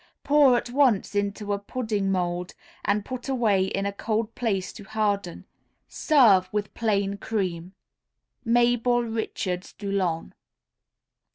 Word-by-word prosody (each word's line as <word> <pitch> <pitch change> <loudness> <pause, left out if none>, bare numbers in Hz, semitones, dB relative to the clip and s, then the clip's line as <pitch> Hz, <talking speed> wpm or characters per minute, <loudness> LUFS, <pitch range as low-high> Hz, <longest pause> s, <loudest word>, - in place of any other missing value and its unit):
Pour 285 -4 +5
at 240 - -4
once 250 -8 +2
into 205 0 -1
a 200 - -2
pudding 205 -2 -2
mould, 180 -1 -2 0.3
and 205 0 0
put 255 +1 -6
away 215 -8 +2
in 195 +1 -2
a 200 - -2
cold 220 +2 -2
place 200 -6 -2
to 210 - -11
harden. 205 -3 -2 0.4
Serve 215 - +4
with 210 -1 -3
plain 200 -3 0
cream. 185 -4 -3 0.7
_Mabel 240 0 +2
Richards 185 -4 -3
Dulon. 195 -5 -2
205 Hz, 120 wpm, -25 LUFS, 195-235 Hz, 0.7 s, Pour